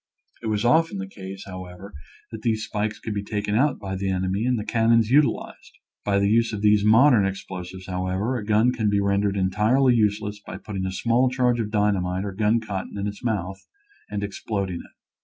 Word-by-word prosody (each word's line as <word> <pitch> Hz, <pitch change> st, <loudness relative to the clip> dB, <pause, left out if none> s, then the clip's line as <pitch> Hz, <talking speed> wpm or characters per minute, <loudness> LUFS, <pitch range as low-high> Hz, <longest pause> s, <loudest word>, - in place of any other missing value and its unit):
It 115 Hz, -, -5 dB
was 105 Hz, +1 st, 0 dB
often 160 Hz, 0 st, +3 dB
the 95 Hz, -, -4 dB
case, 95 Hz, 0 st, -9 dB
however, 95 Hz, +1 st, -9 dB, 0.4 s
that 110 Hz, -1 st, -7 dB
these 110 Hz, -2 st, 0 dB
spikes 105 Hz, 0 st, -2 dB
could 110 Hz, -, -5 dB
be 100 Hz, -, -2 dB
taken 105 Hz, 0 st, -3 dB
out 130 Hz, +5 st, +2 dB
by 95 Hz, -2 st, -5 dB
the 95 Hz, +1 st, -2 dB
enemy 95 Hz, +3 st, -1 dB
and 125 Hz, -1 st, +2 dB
the 105 Hz, -, -4 dB
cannons 115 Hz, -1 st, +3 dB
utilized. 145 Hz, +1 st, +1 dB, 0.3 s
By 100 Hz, -1 st, +1 dB
the 100 Hz, 0 st, +2 dB
use 115 Hz, +2 st, +2 dB
of 105 Hz, 0 st, -4 dB
these 105 Hz, -1 st, +4 dB
modern 115 Hz, +1 st, +6 dB
explosives, 95 Hz, -1 st, -5 dB
how 90 Hz, 0 st, -3 dB
ever, 100 Hz, +8 st, -1 dB
a 115 Hz, -, -3 dB
gun 110 Hz, +4 st, +3 dB
can 110 Hz, -4 st, 0 dB
be 100 Hz, 0 st, +2 dB
rendered 100 Hz, 0 st, +1 dB
entirely 105 Hz, +8 st, +3 dB
useless 105 Hz, -2 st, 0 dB
by 95 Hz, -, -8 dB
putting 95 Hz, -2 st, -4 dB
a -, -, -3 dB
small 120 Hz, +6 st, +2 dB
charge 125 Hz, -2 st, +1 dB
of 110 Hz, -2 st, -2 dB
dynamite 100 Hz, -3 st, 0 dB
or 100 Hz, -, -3 dB
gun 105 Hz, +3 st, +2 dB
cotton 100 Hz, -3 st, -5 dB
in 100 Hz, -, -2 dB
its 105 Hz, +2 st, -6 dB
mouth 95 Hz, -5 st, -3 dB, 0.4 s
and 105 Hz, -1 st, -3 dB
exploding 100 Hz, -2 st, -3 dB
it. -, -, -15 dB
105 Hz, 205 wpm, -24 LUFS, 95-115 Hz, 0.4 s, modern